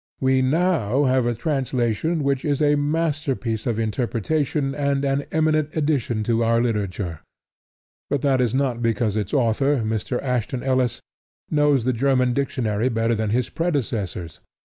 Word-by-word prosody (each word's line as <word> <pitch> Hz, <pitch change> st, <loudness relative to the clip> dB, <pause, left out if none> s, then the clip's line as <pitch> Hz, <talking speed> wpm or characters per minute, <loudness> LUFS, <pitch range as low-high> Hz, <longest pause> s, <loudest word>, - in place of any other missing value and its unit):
We 130 Hz, 0 st, +2 dB
now 140 Hz, -, +2 dB
have 130 Hz, -2 st, +2 dB
a 120 Hz, -, 0 dB
translation 135 Hz, +2 st, -1 dB
which 140 Hz, -1 st, 0 dB
is 145 Hz, -2 st, 0 dB
a 150 Hz, -1 st, +3 dB
masterpiece 145 Hz, -6 st, -1 dB
of 115 Hz, -3 st, 0 dB
interpretation 130 Hz, +6 st, -1 dB
and 140 Hz, -1 st, 0 dB
an 140 Hz, +1 st, 0 dB
eminent 155 Hz, -1 st, +1 dB
addition 135 Hz, -8 st, 0 dB
to 115 Hz, +1 st, +1 dB
our 115 Hz, 0 st, +3 dB
literature; 100 Hz, -7 st, -2 dB, 0.9 s
but 145 Hz, -, -1 dB
that 135 Hz, -2 st, +3 dB
is 120 Hz, -1 st, +1 dB
not 130 Hz, -3 st, 0 dB
because 115 Hz, -2 st, 0 dB
its 105 Hz, -3 st, -2 dB
author, 135 Hz, +3 st, +2 dB
Mr. 110 Hz, +3 st, -2 dB
Ashton 125 Hz, -1 st, -2 dB
Ellis, 130 Hz, -2 st, 0 dB, 0.5 s
knows 145 Hz, -5 st, +3 dB
the 130 Hz, -, +2 dB
German 125 Hz, 0 st, +2 dB
dictionary 120 Hz, -4 st, 0 dB
better 115 Hz, -1 st, +1 dB
than 110 Hz, -1 st, -1 dB
his 120 Hz, +3 st, 0 dB
predecessors. 115 Hz, -, -3 dB
130 Hz, 145 wpm, -23 LUFS, 115-145 Hz, 0.9 s, a